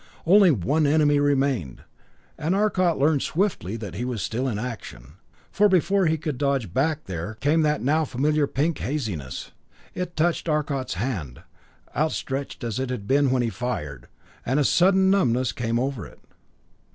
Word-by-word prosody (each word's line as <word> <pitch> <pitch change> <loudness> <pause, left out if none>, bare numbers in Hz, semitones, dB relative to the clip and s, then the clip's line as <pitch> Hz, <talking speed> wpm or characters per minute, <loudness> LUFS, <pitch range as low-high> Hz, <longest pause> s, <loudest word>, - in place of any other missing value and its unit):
Only 195 +2 +6
one 145 - +1
enemy 145 -1 +3
remained; 135 - 0 0.5
and 165 +5 -1
Arcot 190 -4 +2
learned 145 0 +2
swiftly 155 - -1
that 105 -6 -7
he 105 +7 -4
was 125 -4 -3
still 125 +4 -2
in 115 -5 -2
action, 95 - -7 0.3
for 210 +1 +4
before 190 0 +2
he 160 +1 +1
could 150 -4 -4
dodge 135 - 0
back 155 +3 0
there 90 +4 -5
came 145 +8 +2
that 150 -5 +1
now 155 +5 +2
familiar 145 +3 +1
pink 150 +4 -1
haziness. 105 - -4 0.4
It 180 -1 -5
touched 170 +1 0
Arcot's 145 -5 -1
hand, 90 - -4 0.5
outstretched 140 -2 -2
as 115 0 -3
it 130 -1 -2
had 125 -5 -4
been 140 +2 +3
when 125 -1 +1
he 115 - 0
fired, 75 - -5 0.4
and 130 +4 0
a - - +3
sudden 190 +5 +4
numbness 130 -10 +2
came 115 -1 -2
over 130 -2 -3
it. - - -18
140 Hz, 165 wpm, -24 LUFS, 115-155 Hz, 0.5 s, Only